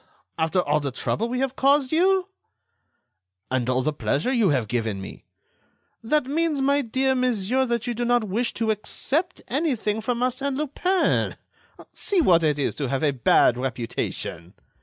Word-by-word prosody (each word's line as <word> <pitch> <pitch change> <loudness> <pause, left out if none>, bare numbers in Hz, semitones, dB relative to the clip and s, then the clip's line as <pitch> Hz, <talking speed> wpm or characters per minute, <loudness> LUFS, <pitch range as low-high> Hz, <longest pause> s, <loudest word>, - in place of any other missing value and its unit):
After 160 +3 +2
all 150 -1 +1
the 145 -2 -2
trouble 220 - -2
we 250 - -2
have 270 -1 -1
caused 275 -1 +3
you!" 370 +3 +3 1.2
"And 130 -1 0
all 130 0 +1
the 155 +2 0
pleasure 150 - -1
you 225 -7 +3
have 130 -7 +1
given 110 -3 -2
me!" 95 - -10 0.8
"That 295 +5 +1
means, 305 +1 0
my 280 +1 +2
dear 265 +2 0
monsieur, 250 0 +1
that 235 -1 -1
you 240 - -1
do 240 +1 -3
not 240 -1 +2
wish 220 +4 -1
to 225 -1 +1
accept 300 - -2
anything 245 -7 -1
from 245 +1 -2
Arsène 260 +2 -1
Lupin. 350 +6 0 0.6
See 395 - 0
what 180 - +5
it 150 -2 +1
is 140 - 0
to 140 -4 -2
have 135 +2 -1
a 150 - +3
bad 125 -2 +3
reputation." 115 -7 -4
235 Hz, 165 wpm, -24 LUFS, -, 1.2 s, what